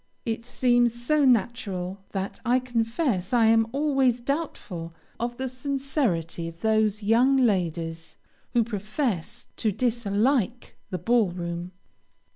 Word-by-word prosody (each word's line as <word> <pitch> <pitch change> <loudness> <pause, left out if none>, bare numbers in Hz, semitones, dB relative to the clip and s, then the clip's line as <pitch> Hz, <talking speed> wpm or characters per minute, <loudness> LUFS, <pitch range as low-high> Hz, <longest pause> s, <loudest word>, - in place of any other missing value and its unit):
It 230 0 -3
seems 240 -1 +2
so 290 +4 +2
natural 200 -6 0
that 195 0 -4
I 250 0 +3
confess 230 - -1
I 235 -2 +5
am 225 0 +4
always 270 -3 +2
doubtful 235 - -4 0.2
of 240 +1 -3
the 265 - -2
sincerity 255 - -2
of 165 0 -10
those 220 -1 +2
young 245 +6 +4
ladies 170 -8 0 0.4
who 240 -2 +4
profess 215 - -3
to 220 - +1
dislike 235 +2 0
the 185 - -2
ball 225 +3 +2
room. 175 0 -5
230 Hz, 120 wpm, -26 LUFS, 190-250 Hz, 0.4 s, I